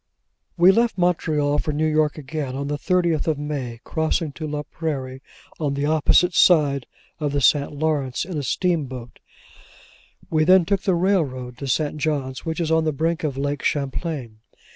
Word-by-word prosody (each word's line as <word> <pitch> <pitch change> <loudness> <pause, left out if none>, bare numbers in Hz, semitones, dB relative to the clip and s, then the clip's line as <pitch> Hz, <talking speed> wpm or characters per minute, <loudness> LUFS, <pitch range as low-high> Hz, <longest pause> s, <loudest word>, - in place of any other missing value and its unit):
We 175 +2 +7
left 230 +1 +1
Montreal 155 -5 +1
for 155 - -2
New 155 +2 0
York 155 -1 +1
again, 140 -2 -4
on 140 +1 -3
the 145 - -1
thirtieth 175 -4 +1
of 155 -2 +1
May, 135 -6 -5
crossing 160 -1 -1
to 155 +2 -6
La 150 0 -3
Prairie, 135 -5 -5 0.4
on 145 -3 -1
the 140 +1 -1
opposite 160 +3 +3
shore 150 -6 +4 0.4
of 145 -2 -2
the 145 - +1
St. 140 +1 +3
Lawrence, 145 -3 -1
in 180 -1 -6
a 150 - -1
steamboat; 135 -6 -2 1.1
we 155 -1 +2
then 185 +1 +5
took 195 +1 0
the 190 -3 +1
railroad 150 -10 0
to 140 - -5
St. 150 +3 0
John's, 140 -4 -2
which 160 0 -3
is 165 -2 -1
on 160 0 +3
the 155 - +1
brink 160 +4 -1
of 140 -4 -2
Lake 145 +1 -2
Champlain. 140 -5 -3
150 Hz, 175 wpm, -22 LUFS, 140-165 Hz, 1.1 s, We